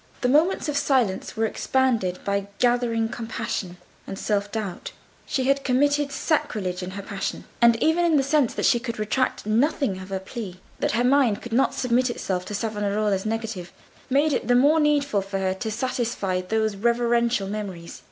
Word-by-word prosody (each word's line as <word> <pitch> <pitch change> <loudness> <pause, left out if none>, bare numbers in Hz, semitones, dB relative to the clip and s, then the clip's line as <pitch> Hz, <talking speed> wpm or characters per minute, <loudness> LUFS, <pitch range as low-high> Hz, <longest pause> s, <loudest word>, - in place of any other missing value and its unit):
The 250 - +2
moments 315 +8 +3
of 295 - -2
silence 255 -11 0
were 225 - +2
expanded 225 -6 0
by 200 0 -1
gathering 240 -2 +2
compunction 225 -5 -4 0.3
and 195 - -6
self 205 0 -1
doubt. 205 -5 -5 0.3
She 265 - 0
had 275 +1 +2
committed 285 +2 +2
sacrilege 195 - -1
in 180 - -5
her 200 - -5
passion. 195 0 -4 0.2
And 235 -1 +6
even 325 0 +3
the 275 - +3
sense 275 -3 +2
that - - -1
she 240 - +4
could 235 -1 -5
retract 215 +4 -1
nothing 230 -2 +1
of 185 +1 -9
her 190 -1 -2
plea, 190 -2 -7 0.2
that - - 0
her 235 +2 +2
mind 250 -5 +3
could 240 - -7
not 260 +3 +2
submit 250 0 +1
itself 185 -6 -3
to 210 - -5
Savonarola's 210 -2 -1
negative, 220 -5 -4 0.4
made 285 +3 +3
it 225 - -1
the 245 - +4
more 290 +6 +5
needful 285 -8 +2
to 195 0 -4
her 190 -1 0
to 220 +4 -4
satisfy 225 -5 -1
those 220 +2 -1
reverential 235 0 +1
memories. 195 -5 -6
230 Hz, 175 wpm, -24 LUFS, 200-260 Hz, 0.4 s, And